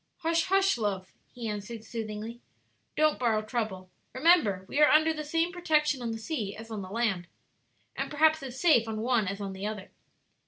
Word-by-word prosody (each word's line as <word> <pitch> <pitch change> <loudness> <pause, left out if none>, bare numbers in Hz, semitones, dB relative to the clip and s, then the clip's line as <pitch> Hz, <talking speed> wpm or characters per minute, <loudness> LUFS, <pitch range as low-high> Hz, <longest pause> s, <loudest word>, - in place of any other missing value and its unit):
"Hush, 330 0 +1
hush, 390 -5 +2
love," 195 -3 -2 0.2
he 240 -2 -6
answered, 210 +2 -5
soothingly; 225 +1 -6 0.6
"don't 310 0 +3
borrow 225 -3 +1
trouble; 215 -5 -4 0.2
remember 255 - +4
we 285 - -2
are 300 - +7
under 315 +1 +5
the 305 -1 -5
same 330 +3 0
protection 305 -6 +1
on 235 - -3
the 225 - -3
sea 220 -5 -4
as 225 +1 -10
on 215 -2 -4
the 185 - -8
land, 195 -5 -1 0.7
and - - -3
perhaps 315 +1 +3
as 260 -1 -7
safe 285 -10 +4
on 220 -1 -3
one 235 -3 +1
as 195 +1 -3
on 195 -1 -4
the 190 +2 -4
other." 210 -3 -6
230 Hz, 190 wpm, -29 LUFS, 210-305 Hz, 0.7 s, are